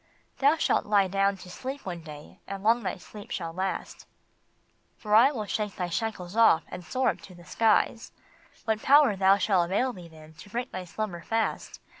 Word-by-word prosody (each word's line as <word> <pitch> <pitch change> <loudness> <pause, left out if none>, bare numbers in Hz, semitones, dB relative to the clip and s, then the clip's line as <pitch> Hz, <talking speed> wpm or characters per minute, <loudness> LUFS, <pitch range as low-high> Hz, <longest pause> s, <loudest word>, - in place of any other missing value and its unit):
"Thou 285 +4 +4
shalt - - +1
lie 200 -2 +3
down 195 +1 +1
to 180 - -12
sleep 265 +7 -7
one 175 -3 -5
day, 150 -2 -12
and 195 0 -6
long 230 +3 +3
that 185 - -4
sleep 205 +5 -12
shall 165 -2 -4
last, 190 +2 -4 0.9
For 210 -1 -4
I 240 +6 +7
will 220 -7 -4
shake 210 -1 -3
thy 180 -1 -3
shackles 190 -1 -4
off 225 -8 +5
and 180 - -8
soar 255 +10 0
up - - -4
to 185 - -13
the 175 0 -15
skies; 225 +2 +1 0.5
What 220 -1 0
power 280 -5 +5 0.2
shall 195 -2 +2
avail 205 +9 0
thee 180 -4 -11
then 155 -1 -15
to 205 - -12
break 240 +4 -4
thy 185 -1 -6
slumber 180 -1 -5
fast? 225 +6 -2
200 Hz, 190 wpm, -27 LUFS, 175-225 Hz, 0.9 s, I